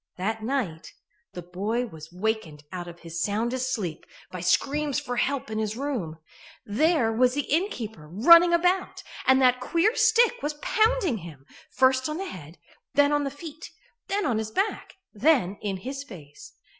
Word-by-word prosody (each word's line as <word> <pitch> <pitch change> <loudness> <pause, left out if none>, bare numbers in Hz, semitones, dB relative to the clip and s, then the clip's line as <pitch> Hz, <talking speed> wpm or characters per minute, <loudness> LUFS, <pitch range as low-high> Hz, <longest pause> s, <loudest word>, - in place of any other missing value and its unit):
That 220 +4 -2
night 220 - -3 0.4
the 180 - -7
boy 205 +8 -2
was 160 -7 -11
wakened 180 -6 -3
out 180 -2 -6
of 170 0 -11
his 165 0 -4
soundest 240 +5 -1
sleep 180 -9 -4 0.2
by 180 - -6
screams 275 - +1
for 245 0 -5
help 265 -4 -1
in 215 - -2
his 215 0 -2
room. 240 - -3 0.5
There 255 +2 +2
was 250 +2 +3
the 290 - +1
innkeeper 240 - -2
running 335 - +7
about, 360 +2 +1 0.2
and 265 0 +6
that 250 0 +4
queer 340 - +1
stick 460 +2 +3
was 295 +1 -2
pounding 430 - +1
him, 155 -6 -12 0.2
first 260 +1 +2
on 305 - -3
the 385 - -4
head, 165 - -10 0.4
then 285 0 +5
on 290 -1 +1
the - - -1
feet, 305 +2 -10 0.4
then 400 +1 -1
on 225 -3 +1
his 220 -1 -3
back, 390 - -2 0.2
then 215 - +2
in 200 -2 -2
his 270 +8 -6
face. 155 - -13
245 Hz, 170 wpm, -26 LUFS, 185-295 Hz, 0.5 s, running